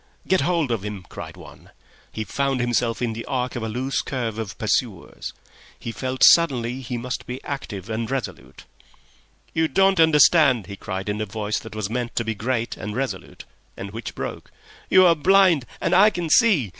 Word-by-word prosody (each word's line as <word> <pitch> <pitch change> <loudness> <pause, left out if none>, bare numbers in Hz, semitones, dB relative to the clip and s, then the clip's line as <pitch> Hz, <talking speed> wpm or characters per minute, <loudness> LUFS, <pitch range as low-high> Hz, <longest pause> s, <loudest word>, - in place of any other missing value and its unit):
"Get 190 - +3
hold 170 -7 0
of 115 -4 -1
him!" 105 -3 -6
cried - - -9
one. - - -14 0.4
He 110 - -4
found 135 +3 -1
himself 120 -1 0
in 115 -2 -1
the 115 +1 -6
arc 125 -1 -2
of 120 - -3
a 110 - -3
loose 130 +5 -1
curve 115 -5 -4
of 105 -3 -5
pursuers. 110 -3 -2 0.5
He 115 - -6
felt 130 +2 -2
suddenly 130 -6 +4
he 125 -1 -4
must 125 +1 -5
be 125 +1 -5
active 115 -9 -6
and 115 0 -3
resolute. 135 -2 -5 0.9
"You 160 0 +2
don't 195 +1 +3
understand," 150 - +5
he 100 - -8
cried, 95 0 -5
in 105 +1 -2
a 110 - -3
voice 105 +2 -2
that 115 -1 -11
was 110 -2 -2
meant 120 +2 -4
to 115 - 0
be 110 - -1
great 115 +2 -2
and 105 0 -6
resolute, 125 -8 -5 0.3
and 100 +1 -7
which 115 +2 -7
broke. - - -6 0.4
"You 185 0 +7
are 170 - +6
blind 175 -3 +4
and - - 0
I 200 +4 +7
can 175 -6 -4
see. 185 - +4
125 Hz, 190 wpm, -23 LUFS, 110-145 Hz, 0.9 s, You